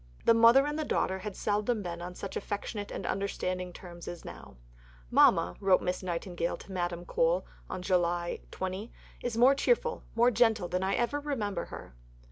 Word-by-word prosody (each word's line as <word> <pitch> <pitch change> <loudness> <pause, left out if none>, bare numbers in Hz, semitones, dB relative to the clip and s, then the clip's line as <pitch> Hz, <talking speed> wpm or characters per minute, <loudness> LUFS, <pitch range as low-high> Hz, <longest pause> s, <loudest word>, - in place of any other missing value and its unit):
The - - +7
mother 230 +4 +7
and 295 +1 -2
the - - 0
daughter 190 -9 0
had 200 0 -6
seldom 210 +1 0
been 170 -1 -5
on 180 +1 -6
such 195 - -6
affectionate 205 +1 -4
and 190 - -5
understanding 185 -2 -2
terms 175 -1 -11
as 175 - -7
now. - - -10 0.6
"Mama," 90 +1 +5
wrote 190 -2 +4
Miss 180 - -1
Nightingale 175 -1 -2
to 195 - -12
Madame 175 -1 -2
Mohl 170 +3 +2 0.4
(July 175 -2 0
20), 190 +4 -4 0.3
"is 240 -2 -3
more 250 +3 +7
cheerful, 475 - +1
more 240 +2 +5
gentle 220 -5 +3
than 180 +1 -1
I 190 +1 +1
ever 240 +5 0
remember 215 -11 -2
her." - - -10
190 Hz, 170 wpm, -30 LUFS, 175-230 Hz, 0.6 s, The